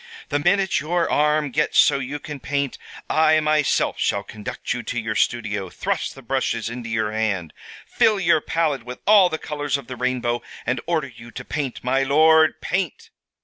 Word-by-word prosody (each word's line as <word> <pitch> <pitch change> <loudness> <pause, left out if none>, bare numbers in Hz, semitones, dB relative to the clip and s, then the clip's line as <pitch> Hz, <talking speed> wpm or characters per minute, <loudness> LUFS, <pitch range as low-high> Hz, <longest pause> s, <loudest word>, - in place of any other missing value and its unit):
"The 145 - 0
minute 190 +4 +2
your 170 +2 0
arm 150 -1 +2
gets 150 +4 0
so 140 - +5
you 135 +2 -4
can 150 0 -8
paint, 140 -1 -2 0.3
I 155 0 +4
myself 155 -1 +1
shall 100 - 0
conduct 105 +4 -5
you 125 - -4
to 120 +1 -3
your 110 -1 -3
studio, 105 -4 -1
thrust - - -3
the 135 - -13
brushes 115 -2 -1
into 120 -1 -6
your 110 -1 -1
hand, 105 -7 -2 0.3
fill 215 -2 +2
your 165 -4 +3
palette 155 -5 0
with 125 +1 -8
all 200 -3 +6
the 160 - -2
colors 145 -2 -2
of 140 - -10
the 125 - -7
rainbow, 125 -1 -1 0.2
and 120 0 -1
order 160 -4 0
you 120 0 -12
to 125 +1 -9
paint, 140 -4 -4
my 130 +2 +1
lord, 155 +3 +4
paint! 180 -4 -3
140 Hz, 185 wpm, -22 LUFS, 120-155 Hz, 0.3 s, all